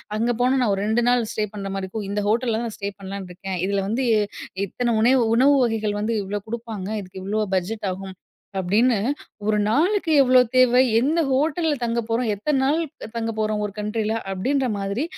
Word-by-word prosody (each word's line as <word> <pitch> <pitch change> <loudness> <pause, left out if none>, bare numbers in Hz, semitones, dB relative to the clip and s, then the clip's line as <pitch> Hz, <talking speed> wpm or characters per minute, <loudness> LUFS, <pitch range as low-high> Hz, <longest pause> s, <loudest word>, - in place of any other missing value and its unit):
அங்க 230 +3 +1
போனா 255 +2 +3
நான் 230 -4 +2
ஒரு 195 - -3
2 220 +2 +2
நாள் 245 0 +4
ஸ்டே 215 - -1
பண்ற 200 -1 -5
மாரி 195 0 -3
இருக்கும். 205 +2 -5
இந்த 205 +1 -1
ஹோட்டல்ல 230 +1 +1
தான் 235 +1 -2
நான் 220 - -7
ஸ்டே 200 -1 -3
பண்ணலான்னு 195 -1 -7
இருக்கேன். 190 +1 -5
இதுல 200 0 0
வந்து 230 +6 -1 0.6
இத்தனை 240 +4 -1
உணைவு 250 +2 +4
உணவு 275 +4 +5
வகைகள் 220 -3 -1
வந்து 220 +2 -1
இவ்ளோ 205 +2 -3
குடுப்பாங்க. 225 -4 -5
இதுக்கு 185 0 -10
இவ்ளோ 210 +3 -1
பட்ஜெட் 200 +3 -2
ஆகும்." 190 0 -7 0.4
அப்படின்னு 215 +6 +3 0.5
ஒரு 215 0 +2
நாளுக்கு 340 - +2
எவ்ளோ 255 -1 +6 0.2
தேவை, 255 0 +6 0.2
எந்த 295 +7 +1
ஹோட்டல்ல 310 +4 +1
தங்கப் 230 -1 -1
போறோம், 230 +1 0
எத்தன 270 +8 0
நாள் 290 +4 +2 0.4
தங்கப் 225 -1 -3
போறோம், 215 -1 0
ஒரு 205 - -6
கண்ட்ரில. 210 +1 -1 0.2
அப்படின்ற 260 +8 0
மாரி 200 +6 -2
220 Hz, 185 wpm, -23 LUFS, 200-250 Hz, 0.6 s, எவ்ளோ